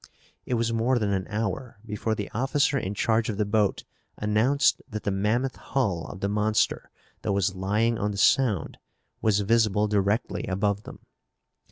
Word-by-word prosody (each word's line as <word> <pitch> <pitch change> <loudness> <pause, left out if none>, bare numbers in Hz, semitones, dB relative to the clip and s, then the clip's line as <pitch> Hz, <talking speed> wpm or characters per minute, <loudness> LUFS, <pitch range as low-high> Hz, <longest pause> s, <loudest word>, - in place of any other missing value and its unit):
It 125 - 0
was 115 0 0
more 120 +3 +2
than 105 -3 0
an 95 -1 -2
hour 110 +3 -3
before 110 0 -2
the 105 -1 -5
officer 140 +5 +1
in 100 -6 -2
charge 115 0 +1
of 105 - -3
the 105 - +1
boat 105 -1 +1 0.3
announced 110 +7 +2
that 110 -2 -5
the 100 - 0
mammoth 110 +7 0
hull 100 -11 -1
of 95 - -9
the 100 - 0
monster 105 0 0 0.3
that - - -1
was 100 -1 +1
lying 105 +5 0
on 105 - 0
the 100 - -5
Sound 110 - +2 0.4
was 105 -2 +2
visible 105 -1 +2
directly 105 +4 0
above 100 +1 -1
them. - - -10
105 Hz, 170 wpm, -26 LUFS, 100-115 Hz, 0.4 s, more